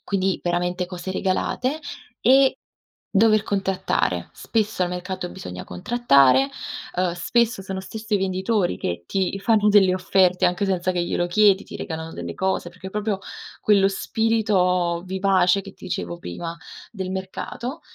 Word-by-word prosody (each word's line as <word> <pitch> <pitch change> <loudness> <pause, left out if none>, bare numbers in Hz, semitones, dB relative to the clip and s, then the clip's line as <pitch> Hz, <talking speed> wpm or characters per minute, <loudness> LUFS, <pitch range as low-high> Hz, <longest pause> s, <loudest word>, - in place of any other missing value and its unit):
quindi 195 -1 0
veramente 175 +1 -1
cose 180 0 -6
regalate 250 +10 -1 0.4
e 265 +2 +5 0.6
dover 215 +1 +4
contrattare. 190 - -1
Spesso 215 -4 -1
al 175 - -1
mercato 180 0 -4
bisogna 90 - -8
contrattare, 140 - +3 0.5
uhm, 180 0 +1
spesso 225 +5 +1
sono 190 0 -5
stesso 220 +2 -6
i - - +5
venditori 190 +1 0
che 85 0 -3
ti 190 0 -1
fanno 210 0 +3
delle 195 -3 +5
offerte, 185 -1 +3
anche 180 +3 +1
senza 185 -1 0
che 175 -1 0
glielo 175 0 -1
chiedi, 200 +1 +4
ti - - -9
regalano 160 -1 -5
delle - - -6
cose 190 -2 -1
perché 180 +2 -10
proprio 210 -1 -2 0.4
quello 200 -2 +4
spirito 190 -5 +1
vivace, 190 0 +2
che 195 0 -11
ti - - -19
dicevo 85 - -4
prima, 165 - -6 0.4
del 190 -4 -5
mercato, 190 - -5
190 Hz, 145 wpm, -23 LUFS, 180-210 Hz, 0.6 s, e